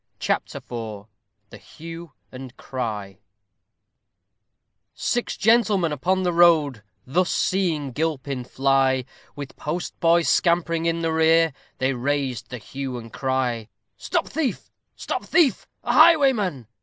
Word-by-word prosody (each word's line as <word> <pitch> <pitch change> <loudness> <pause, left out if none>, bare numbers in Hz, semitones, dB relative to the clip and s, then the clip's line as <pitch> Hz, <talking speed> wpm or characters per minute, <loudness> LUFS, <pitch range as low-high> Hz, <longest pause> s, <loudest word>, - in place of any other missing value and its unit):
CHAPTER - - -2
IV 110 -4 -7 0.5
THE 105 - -11
HUE 165 - -10 0.2
AND 130 -1 -10
CRY 105 -7 -5 1.8
Six 240 0 -2
gentlemen 205 -6 +3
upon 185 +6 0
the 175 -1 0
road 160 -8 +4 0.2
Thus 175 +7 +1
seeing 165 -7 0
Gilpin 140 -3 -2
fly, 135 -1 +1 0.3
With 140 -1 -8
postboy 170 +1 0
scampering 170 -1 +1
in 165 0 0
the 165 -1 0
rear, 160 -1 +4 0.2
They 130 +1 0
raised 130 -3 -2
the 125 - -6
hue 130 +2 -6
and 115 -1 -10
cry: 125 -4 -2 0.3
Stop - - -2
thief! 300 -3 -3 0.2
stop - - -4
thief! 300 - +2 0.2
a 240 - 0
highwayman! 265 - +4
150 Hz, 120 wpm, -23 LUFS, 130-175 Hz, 1.8 s, road